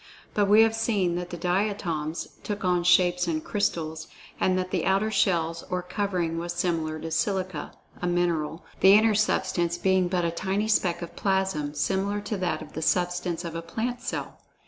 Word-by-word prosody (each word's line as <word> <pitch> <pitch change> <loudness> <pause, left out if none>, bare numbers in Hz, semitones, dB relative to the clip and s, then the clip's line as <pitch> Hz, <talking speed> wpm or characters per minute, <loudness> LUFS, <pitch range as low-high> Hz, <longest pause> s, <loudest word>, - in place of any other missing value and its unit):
But 205 -1 +2
we 210 +2 +7
have 225 0 +2
seen 210 -6 +1
that 175 0 -4
the 175 - -6
Diatoms 175 -4 -1
took 205 -2 -4
on 180 -1 +2
shapes 180 0 +4
of 155 -2 -1
crystals, 160 -6 -2 0.3
and 185 0 +2
that 185 0 -2
the 180 -4 0
outer 195 +3 +2
shell 170 -6 +2
or 180 0 -2
covering 180 -3 -1
was 175 +1 -3
similar 165 -3 -1
to 160 +1 -6
silicia, 185 0 -1 0.3
a 180 - -1
mineral, 170 -2 0
the 195 +1 +7
inner 220 +1 +5
substance 175 -4 +1
being 190 0 +2
but 175 -1 0
a 170 - 0
tiny 190 +5 -1
speck 180 -5 +1
of 170 - -9
plasm, 190 -7 0
similar 200 +4 0
to 205 0 -4
that 185 -2 -1
of - - -14
the 160 - -4
substance 175 0 0
of 165 - -5
a 165 - -4
plant 235 +8 -3
cell. 245 - -5
180 Hz, 185 wpm, -26 LUFS, 170-200 Hz, 0.3 s, we